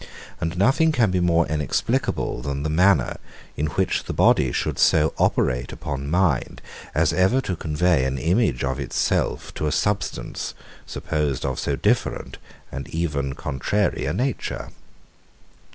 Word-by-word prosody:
And 85 +1 -3
nothing 135 - +4
can 120 -9 +2
be 90 - +1
more 85 -1 +3
inexplicable 75 -4 -1
than 70 +2 -3
the 80 - -1
manner, 90 -4 +3 0.4
in 75 - -1
which 85 +4 0
body 65 - +3
should - - -2
so 80 -1 +4
operate 60 -1 +1
upon 70 -3 -5
mind 85 -5 +1 0.4
as 80 -1 +3
ever 95 +8 +3
to 90 - -3
convey 80 -2 +1
an 65 +1 -1
image 80 - +1
of 65 0 -1
itself 70 - -1
to 75 - -2
a - - 0
substance, 100 -8 -2 0.3
supposed 75 -4 -2
of 65 -1 -2
so - - -1
different, - - -1 0.3
and 70 -1 -6
even 70 -5 -2
contrary 75 +10 -1
a - - 0
nature. 130 +2 -2
80 Hz, 140 wpm, -23 LUFS, 70-90 Hz, 0.4 s, nothing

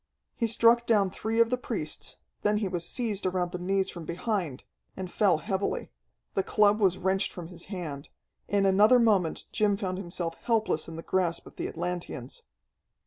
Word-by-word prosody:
He 230 - 0
struck 230 +1 +4
down 205 -5 +3
three 220 +4 -2
of 230 0 +5
the 250 - +1
priests; 200 -12 -3 0.2
then 210 0 +2
he 210 -2 0
was 175 -2 -2
seized 215 -6 -1
around 180 -1 -1
the 180 - -4
knees 190 +1 0
from 170 - -8
behind, 170 - -2 0.3
and 185 -2 -5
fell 195 -6 +3
heavily. 195 +4 -2 0.4
The - - +2
club 210 +2 +3
was 190 -3 +3
wrenched 190 0 0
from 170 -2 -8
his 175 -1 -9
hand. 165 -8 -6 0.4
In 200 -1 +2
another 205 +6 +6
moment 205 -9 +2
Jim 205 -2 +2
found 185 -3 -3
himself 170 -2 -4
helpless 220 -9 +1
in 165 - -7
the 165 - -7
grasp 180 -3 0
of - - -13
the - - -2
Atlanteans. 175 -7 -5
190 Hz, 180 wpm, -28 LUFS, 175-210 Hz, 0.4 s, another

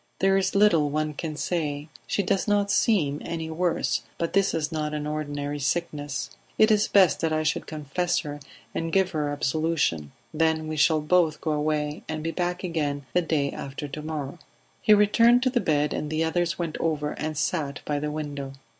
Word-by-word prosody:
"There 195 0 +3
is 195 0 +1
little 170 -8 +4
one 155 +1 -1
can 155 +1 -5
say. 150 -3 -2 0.2
She 200 - 0
does 195 +2 0
not 205 -1 +2
seem 155 -11 +2
any 160 -1 -4
worse, 175 +1 0 0.2
but 170 - -2
this 195 0 +3
is 155 0 -2
not 150 -1 -2
an 150 0 -3
ordinary 145 -1 -3
sickness. 145 -1 -2 0.3
It 215 +1 +5
is 210 0 +3
best 185 -8 +5
that 160 - 0
I 155 0 +1
should 155 +1 -1
confess 155 +4 -1
her 145 -1 -6 0.3
and 165 0 -2
give 190 0 +2
her 150 -3 -1
absolution; 145 - 0 0.2
then 160 0 +1
we 155 - -3
shall 155 +1 +3
both 160 0 +2
go 160 - -2
away 150 0 -1
and 155 -1 -3
be 165 - -1
back 180 +1 -2
again 145 -5 -2
the 180 - +4
day 150 -4 0
after 140 +1 -6
to 150 +2 -6
morrow." 150 0 -5 0.4
He 215 - +6
returned 230 +4 +5
to 255 - +2
the 245 -2 +1
bed, 150 -1 +1
and 150 - -3
the 155 +1 0
others 170 +1 0
went 170 -3 -3
over 150 -2 -1
and 155 0 -4
sat 145 -3 -1
by 145 -1 -1
the 150 +1 -2
window. 145 -3 -5
155 Hz, 195 wpm, -26 LUFS, 150-175 Hz, 0.4 s, He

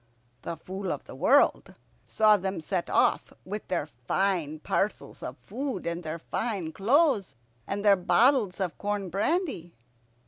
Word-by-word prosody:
The 170 - -5
Fool 190 +4 -5
of - - -4
the - - -10
World - - +3 0.3
saw 215 -1 +5
them 190 -1 -2
set 175 +2 -2
off, - - +2
with 205 +3 -6
their 180 - -1
fine 155 +5 -1
parcels 195 +6 -2
of - - -6
food, 275 -1 -5
and 170 +1 -2
their 160 -1 -4
fine 190 -1 -3
clothes, 225 - +2 0.3
and 200 +1 -3
their 200 -1 +7
bottles 215 +2 +3
of 180 -3 -3
corn 205 -3 -2
brandy. 210 - -1
195 Hz, 145 wpm, -28 LUFS, 170-215 Hz, 0.3 s, their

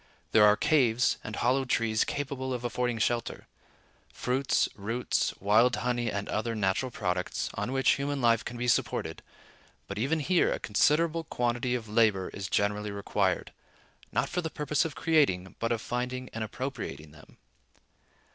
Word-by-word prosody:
There 105 -1 +6
are 105 0 +5
caves 125 -5 +3
and 110 - -5
hollow 130 +3 +2
trees 115 -3 +1
capable 130 -2 -3
of 120 - -6
affording 120 0 -1
shelter; 115 +1 -1 0.7
fruits, 130 +2 +1
roots, 115 +5 -1
wild 115 +5 +4
honey, 120 -2 -1
and 100 0 -3
other 115 +1 -2
natural 100 +5 0
products, 90 -6 -2
on - - -3
which 135 0 +3
human 140 0 -2
life 115 -2 +3
can 120 - -6
be 120 +1 -2
supported; 120 - 0 0.6
but 100 +1 -6
even 145 +8 +1
here 175 +4 +2
a - - 0
considerable 160 +9 +2
quantity 120 -1 -1
of 115 -3 -5
labor 105 -3 +2
is 95 -2 -6
generally 105 +1 0
required, 100 0 -1 0.6
not - - +1
for 180 - -2
the 160 - -3
purpose 150 0 0
of 160 - -4
creating, 135 - +2
but 115 0 -1
of 115 -2 0
finding 125 +1 -3
and 115 - -3
appropriating 105 - -5
them. 75 0 -17
120 Hz, 155 wpm, -29 LUFS, 105-130 Hz, 0.7 s, There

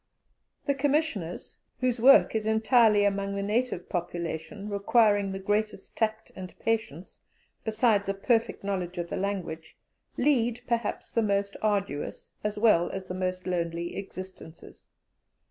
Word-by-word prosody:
The 280 - +2
Commissioners, 275 - -1 0.2
whose 250 -2 0
work 270 +4 +7
is 220 -1 -1
entirely 220 -1 +4
among 200 0 0
the 200 - -2
native 215 -3 -1
population, 175 +3 -4
requiring 205 -1 +3
the 195 - -4
greatest 205 +1 -2
tact 220 -1 -1
and 185 -1 -9
patience, 225 -6 -3 0.4
besides 215 -2 +2
a 195 - 0
perfect 225 +2 0
knowledge 185 -3 -3
of 170 0 -4
the - - -1
language, 175 -5 -4 0.4
lead, 245 -4 +2
perhaps, 235 -3 -2
the 230 - +3
most 200 -1 0
arduous, 200 -8 -2
as 210 0 -2
well 205 -6 +4
as 190 -1 -5
the 180 - -6
most 185 0 -3
lonely, 170 -1 -2
existences. 185 -4 -9
200 Hz, 135 wpm, -28 LUFS, 185-225 Hz, 0.4 s, work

